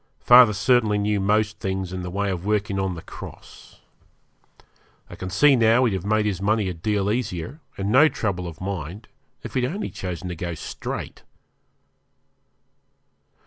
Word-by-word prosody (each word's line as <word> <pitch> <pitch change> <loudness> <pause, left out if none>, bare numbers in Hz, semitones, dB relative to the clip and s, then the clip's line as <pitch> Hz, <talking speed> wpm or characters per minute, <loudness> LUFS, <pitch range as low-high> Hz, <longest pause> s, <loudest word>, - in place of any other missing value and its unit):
Father 120 -3 +8
certainly 110 0 +2
knew 105 0 0
most 105 +1 +1
things 95 -1 -3
in 95 - -4
the 90 - -5
way 100 +2 -1
of 90 -2 -4
working 105 -1 0
on 95 -2 -1
the 80 - -9
cross. - - -12 1.3
I - - -8
can 95 - -6
see 135 +9 +5
now 115 +1 +4
he'd 115 - +1
have 95 +1 -3
made 110 0 +2
his 95 -3 -2
money 105 0 +1
a - - -3
deal 100 +4 -1
easier, 110 - -3 0.2
and 100 +1 -2
no 140 +6 +7
trouble 100 -9 -3
of 80 -1 -9
mind, 95 +1 -6 0.3
if - - -7
he'd 130 - 0
only 190 +12 -3
chosen 90 0 -5
to 90 - -4
go 85 0 -4
straight. 75 - -6
100 Hz, 165 wpm, -23 LUFS, 95-110 Hz, 1.3 s, Father